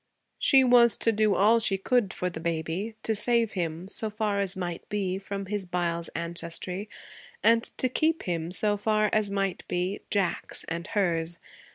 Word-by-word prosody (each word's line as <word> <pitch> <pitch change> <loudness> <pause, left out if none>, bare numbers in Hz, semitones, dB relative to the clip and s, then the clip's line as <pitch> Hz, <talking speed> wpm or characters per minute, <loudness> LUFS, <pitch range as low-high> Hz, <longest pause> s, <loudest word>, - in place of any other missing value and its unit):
She 270 -1 +5
was 240 -2 +5
to 230 - +2
do 215 -1 +2
all 220 +4 +5
she 195 -3 +1
could 210 0 +1
for 180 - -3
the 160 - -7
baby: 170 +6 -3
to 220 - 0
save 230 +1 +2
him, 170 -1 -3
so 220 +2 -1
far 210 -1 -1
as 195 -2 +1
might 175 -2 -5
be, 190 -2 -1
from 195 0 -5
his 200 -1 -3
Byles 170 -1 -2
ancestry, 170 +4 -3 0.5
and 230 +1 +4
to 255 - +1
keep 315 +6 0
him, 170 -1 -3
so 205 +2 +1
far 215 0 +1
as 215 -1 +2
might 195 -2 -2
be, 180 +3 -2
Jack's 195 -4 +1
and 170 +2 -5
hers. 170 -5 +1
195 Hz, 175 wpm, -27 LUFS, 175-215 Hz, 0.5 s, She